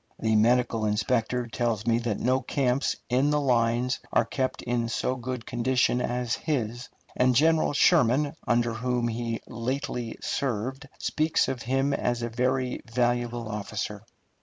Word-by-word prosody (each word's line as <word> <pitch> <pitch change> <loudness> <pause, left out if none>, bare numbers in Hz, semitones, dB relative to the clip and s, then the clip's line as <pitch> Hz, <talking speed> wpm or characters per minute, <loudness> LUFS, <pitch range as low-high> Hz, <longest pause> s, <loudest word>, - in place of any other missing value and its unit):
The 110 -1 +1
medical 115 0 +3
inspector 115 +3 0
tells 115 -2 -2
me 115 0 +3
that 115 -4 -2
no 130 +2 +2
camps 135 -2 0
in 130 +3 +2
the 150 0 +2
lines 125 -1 +1
are - - +3
kept 130 -1 -2
in 120 -1 -1
so 125 +2 -1
good 125 -2 -5
condition 125 +1 +1
as 125 -1 -1
his; 120 -5 -2 0.3
and 125 0 +3
General 160 +4 +4
Sherman, 145 -2 +4
under 120 0 +2
whom 120 +1 -1
he 115 0 -3
lately 120 0 -3
served, 130 +2 -3
speaks 155 +1 +1
of 125 -3 -3
him 135 +4 0
as 120 -3 -1
a 120 - -2
very 125 +2 -1
valuable 120 -1 0
officer. 105 -1 -4
120 Hz, 145 wpm, -27 LUFS, 115-130 Hz, 0.3 s, General